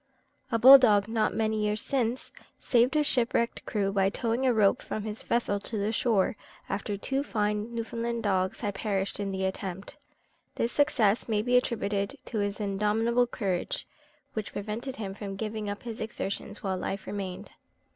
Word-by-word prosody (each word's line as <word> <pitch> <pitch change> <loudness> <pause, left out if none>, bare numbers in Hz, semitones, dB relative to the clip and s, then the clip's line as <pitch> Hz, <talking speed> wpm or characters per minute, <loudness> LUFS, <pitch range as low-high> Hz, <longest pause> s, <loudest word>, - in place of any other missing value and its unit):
A 230 - +3
bull 265 +4 +10
dog, 210 -5 +4
not 225 -1 0
many 220 -1 +1
years 210 0 0
since, 250 -2 -1 0.3
saved 245 +4 +3
a 300 - +4
shipwrecked 235 -4 +1
crew 200 -3 0
by 195 -1 +2
towing 235 +5 0
a - - +5
rope 215 -4 +3
from 215 - -4
the 215 0 -3
vessel 215 -2 -1
to 215 +2 -5
the 205 +1 0
shore, 225 0 +2 0.3
after 200 +1 -3
two 270 +7 -1
fine 210 -3 -1
Newfoundland 230 0 -3
dogs 185 -2 0
had 205 -3 -1
perished 195 -1 -2
in 200 -1 -2
the 190 0 -1
attempt. 190 +5 -5 0.6
This 235 - 0
success 235 -7 +2
may 210 -1 +1
be 250 +1 +2
attributed 205 -5 0
to 220 - -3
his 205 0 -1
indomitable 215 +4 +1
courage, 210 - -2 0.5
which 215 -2 -4
prevented 220 +6 -4
him 200 -3 -5
from 200 -1 -6
giving 215 0 -4
up 205 - -5
his 230 -2 -6
exertions 205 -1 -4
while 190 -2 -1
life 195 +1 -4
remained. 195 -1 -5
215 Hz, 170 wpm, -28 LUFS, 200-235 Hz, 0.6 s, bull